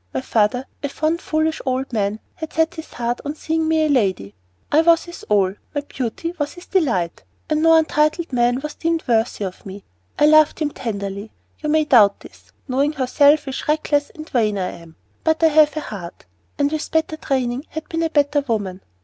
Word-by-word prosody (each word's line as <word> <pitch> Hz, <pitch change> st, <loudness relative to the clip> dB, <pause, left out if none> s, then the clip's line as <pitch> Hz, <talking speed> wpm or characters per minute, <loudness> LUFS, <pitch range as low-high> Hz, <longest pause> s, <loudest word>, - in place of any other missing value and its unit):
My 130 Hz, -, 0 dB
father, 225 Hz, -, +1 dB, 0.2 s
a 285 Hz, -, -2 dB
fond, 315 Hz, +4 st, -1 dB
foolish 315 Hz, 0 st, -1 dB
old 260 Hz, 0 st, -2 dB
man, 210 Hz, -1 st, -1 dB
had 320 Hz, -1 st, -8 dB
set 320 Hz, +2 st, +1 dB
his 320 Hz, -2 st, -9 dB
heart 240 Hz, 0 st, -2 dB
on 290 Hz, +1 st, -4 dB
seeing 320 Hz, 0 st, -1 dB
me 320 Hz, -1 st, +2 dB
a -, -, +2 dB
lady. 195 Hz, -, 0 dB, 0.4 s
I 310 Hz, -, +5 dB
was 335 Hz, 0 st, +4 dB
his 345 Hz, -1 st, -10 dB
all; 195 Hz, -3 st, +3 dB, 0.2 s
my 290 Hz, -, 0 dB
beauty 285 Hz, +4 st, -4 dB
was 290 Hz, 0 st, -2 dB
his 350 Hz, -, -12 dB
delight, 230 Hz, -, 0 dB, 0.2 s
and 305 Hz, -1 st, 0 dB
no 325 Hz, 0 st, +6 dB
untitled 310 Hz, 0 st, +1 dB
man 245 Hz, +1 st, +2 dB
was 300 Hz, +1 st, -5 dB
deemed 330 Hz, 0 st, -1 dB
worthy 225 Hz, -2 st, +1 dB
of 185 Hz, -1 st, -8 dB
me. 195 Hz, 0 st, -9 dB, 0.3 s
I -, -, +4 dB
loved 310 Hz, 0 st, +5 dB
him 300 Hz, -2 st, -1 dB
tenderly. 200 Hz, -3 st, -5 dB, 0.3 s
You 300 Hz, -, -3 dB
may 310 Hz, 0 st, +3 dB
doubt 210 Hz, -8 st, +5 dB
this, -, -, -16 dB, 0.2 s
knowing 280 Hz, +3 st, +1 dB
how 265 Hz, -3 st, -1 dB
selfish, 285 Hz, 0 st, +2 dB
reckless, 300 Hz, -1 st, +1 dB
and 310 Hz, -1 st, -9 dB
vain 215 Hz, -7 st, +1 dB
I 185 Hz, -1 st, -2 dB
am, 165 Hz, -1 st, -13 dB, 0.3 s
but 320 Hz, 0 st, +1 dB
I 325 Hz, -, +7 dB
have 305 Hz, 0 st, +4 dB
a -, -, -1 dB
heart, 180 Hz, -10 st, -8 dB, 0.3 s
and 285 Hz, 0 st, +1 dB
with 310 Hz, -1 st, -3 dB
better 320 Hz, -1 st, 0 dB
training 260 Hz, -1 st, -2 dB
had 315 Hz, 0 st, -6 dB
been 330 Hz, 0 st, -2 dB
a 325 Hz, -, +1 dB
better 290 Hz, -1 st, +2 dB
woman. 205 Hz, -8 st, -3 dB
285 Hz, 200 wpm, -21 LUFS, 225-315 Hz, 0.4 s, I